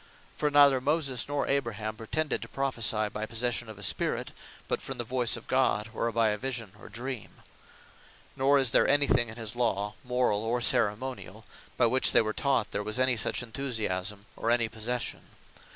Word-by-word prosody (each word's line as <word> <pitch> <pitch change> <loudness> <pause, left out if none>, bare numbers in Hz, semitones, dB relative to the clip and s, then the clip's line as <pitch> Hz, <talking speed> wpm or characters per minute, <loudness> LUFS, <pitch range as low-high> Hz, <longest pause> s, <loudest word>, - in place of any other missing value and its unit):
For 150 - 0
neither 140 -2 +5
Moses, 140 -3 0
nor 145 0 -1
Abraham 110 -6 -2
pretended 145 +8 -1
to - - -7
Prophecy 115 -6 +1
by 110 +1 -4
possession 120 +1 -1
of 110 - -9
a 100 - -5
Spirit; - - 0 0.4
but - - -1
from - - -6
the 120 - -2
voyce 120 0 +1
of 115 - -11
God; 115 -5 +1
or 115 +1 -1
by 115 -1 +2
a 105 0 -2
Vision 120 -5 -3
or - - -12
Dream: 120 +1 -7 0.9
Nor 140 +2 +3
is 135 -4 +2
there - - +4
any 145 +1 +4
thing 120 -4 +2
in 110 - -8
his 115 0 -4
Law, 105 -4 0
Morall, 125 -4 +1
or 115 +2 -1
Ceremoniall, 110 -3 -1 0.3
by 120 - +4
which 130 +3 +3
they - - +6
were 110 0 -2
taught, 135 -5 0
there 100 - -2
was 110 +3 -3
any 130 -1 +3
such 115 +2 0
Enthusiasme; 105 -6 -3
or 115 - -2
any 120 -1 +3
Possession. 115 +2 -3
120 Hz, 185 wpm, -29 LUFS, 110-130 Hz, 0.9 s, they